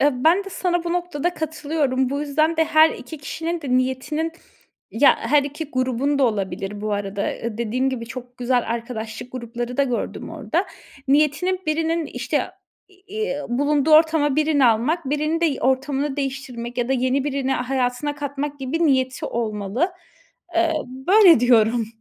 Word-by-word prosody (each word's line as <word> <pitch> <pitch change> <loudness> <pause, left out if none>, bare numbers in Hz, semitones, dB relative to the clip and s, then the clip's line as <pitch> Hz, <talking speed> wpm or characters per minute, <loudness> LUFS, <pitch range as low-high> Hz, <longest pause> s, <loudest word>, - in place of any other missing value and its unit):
Eee, 265 -2 +1
ben 360 +5 +4
de 390 - -8
sana 350 -2 -1
bu 340 - -1
noktada 350 -1 -2
katılıyorum. 295 -5 -1
Bu 280 - -2
yüzden 310 +3 +1
de 320 - +4
her 315 +1 +5
2 320 - -8
kişinin 330 +4 -4
de 280 - -5
niyetinin, 265 +5 -1 0.6
ya 260 +5 +5
her 285 +5 +3
2 290 +3 -5
grubun 260 +2 0
da 275 - +4
olabilir 195 -2 -2
bu 210 0 -2
arada, 200 0 -2
eee, 230 -2 -6
dediğim 245 +3 0
gibi 235 -3 -5
çok 250 0 -9
güzel 245 0 +1
arkadaşlık 230 0 -6
grupları 240 0 -5
da 280 - +4
gördüm 250 -4 -3
orada, - - -2 0.4
niyetinin 305 +6 +2
birinin, 325 +1 0
işte, - - -1 0.5
eee, 380 -5 -5
bulunduğu 285 +4 +1
ortama 310 -2 +4
birini 300 -3 +3
almak, 250 +9 +2
birinin 305 +3 0
de 325 -5 +1
ortamını 270 +2 0
değiştirmek 260 -3 -4
ya 240 0 0
da - - +2
yeni 260 +1 +1
birini 275 -2 -1
hayatına 255 +2 -1
katmak 285 0 -4
gibi 315 +5 0
niyeti 260 -2 +1
olmalı. 225 - -2 0.6
Eee, 335 -1 +3
böyle 335 - +5
diyorum. 230 -2 +3
275 Hz, 155 wpm, -22 LUFS, 245-315 Hz, 0.6 s, her